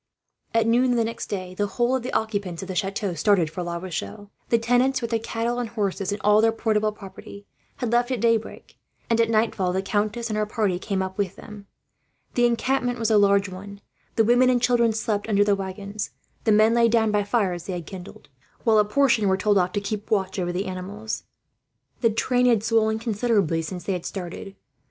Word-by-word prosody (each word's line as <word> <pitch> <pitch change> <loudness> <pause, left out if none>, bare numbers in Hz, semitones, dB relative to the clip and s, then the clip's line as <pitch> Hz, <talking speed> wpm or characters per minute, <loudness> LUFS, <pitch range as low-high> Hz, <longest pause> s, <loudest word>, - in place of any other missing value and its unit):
At 225 -1 +4
noon 245 +2 +3
the 230 - +2
next 230 +1 -4
day, 185 -2 -5
the 205 +2 -1
whole 240 +4 0
of 260 - -1
the 250 - -5
occupants 200 -6 -2
of - - -8
the 190 - -4
chateau 195 +1 -2
started 170 -1 +2
for 180 - -5
La 170 -1 -3
Rochelle. 180 - -6 0.2
The 235 - +4
tenants, 245 +3 +2
with 235 -1 -4
their 230 - +1
cattle 230 +2 -2
and 240 -2 -3
horses 200 -3 -2
and 205 - -3
all 210 +1 +5
their 225 0 +4
portable 215 -1 0
property, 200 0 -11 0.3
had 245 -4 -3
left 240 +1 +2
at 255 -3 -1
daybreak; 230 0 -1 0.3
and 230 0 +4
at 230 - +1
nightfall 215 -4 +1
the 190 +1 -1
countess 215 +4 -1
and 215 - -1
her 210 0 0
party 205 -5 0
came 190 -1 -2
up 190 +1 -6
with 195 -3 -1
them. 210 -2 -11 0.7
The 240 0 +4
encampment 245 +1 0
was 225 -1 0
a 215 - +6
large 200 0 +4
one. 200 +2 -9 0.4
The 225 - +4
women 245 +3 +4
and 250 -1 +3
children 235 -1 +3
slept 215 -1 -2
under 205 -1 +4
the 205 -1 +3
waggons. 200 +2 -5 0.4
The 220 - +4
men 215 +2 +5
lay 235 0 +4
down 220 -1 +2
by 210 0 +2
fires 195 -5 -1
they 190 - -4
had 175 -2 -5
kindled, 185 +3 -10 0.4
while 220 -2 +4
a 210 - +4
portion 235 -1 +2
were 190 0 +2
told 205 0 +3
off 180 0 +1
to 205 - 0
keep 205 +1 -4
watch 195 -3 0
over 175 -1 -1
the 185 +3 -2
animals. 195 +4 -5 0.7
The 230 - +3
train 250 +3 +1
had 230 -4 +3
swollen 220 -1 +2
considerably 210 -7 0
since 180 +2 -6
they 195 - -1
had 180 -2 -4
started. 190 +1 -7
210 Hz, 215 wpm, -24 LUFS, 195-230 Hz, 0.7 s, a